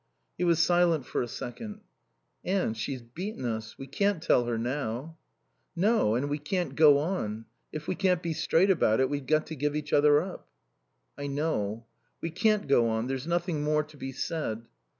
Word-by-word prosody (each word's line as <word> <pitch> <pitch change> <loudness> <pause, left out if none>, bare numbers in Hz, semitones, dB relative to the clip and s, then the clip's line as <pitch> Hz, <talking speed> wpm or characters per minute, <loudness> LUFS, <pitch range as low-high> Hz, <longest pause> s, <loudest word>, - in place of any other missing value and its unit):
He - - -2
was 170 -2 +4
silent 170 -3 +3
for - - -2
a 120 - -2
second. 210 - -7 0.6
"Anne 185 - 0
she's 120 +3 -4
beaten 155 - -6
us. 110 -1 -4
We 135 - -7
can't 200 +4 0
tell 125 -6 +3
her 120 -1 -1
now." 130 +5 -3 0.6
"No. 190 - +3
And 130 +4 0
we 145 +1 -2
can't 175 +4 -2
go 150 -3 +7
on. 125 - -2 0.3
If 155 0 -6
we - - 0
can't 185 -2 +1
be 165 -1 -1
straight 180 +5 +3
about 110 - +3
it 130 +1 +2
we've 140 -2 -3
got 155 +1 +2
to 160 - -6
give 150 +1 -1
each 150 0 -4
other 145 0 +6
up." 180 +3 -6 0.7
"I 145 - -3
know. 120 -7 -2 0.3
We 165 - -4
can't 215 +4 +2
go 120 -4 +4
on. 110 +1 -1
There's 135 +3 -3
nothing 170 -2 0
more 150 0 +2
to 150 0 -16
be 135 -1 -5
said." 130 -5 -3
150 Hz, 190 wpm, -28 LUFS, 125-175 Hz, 0.7 s, go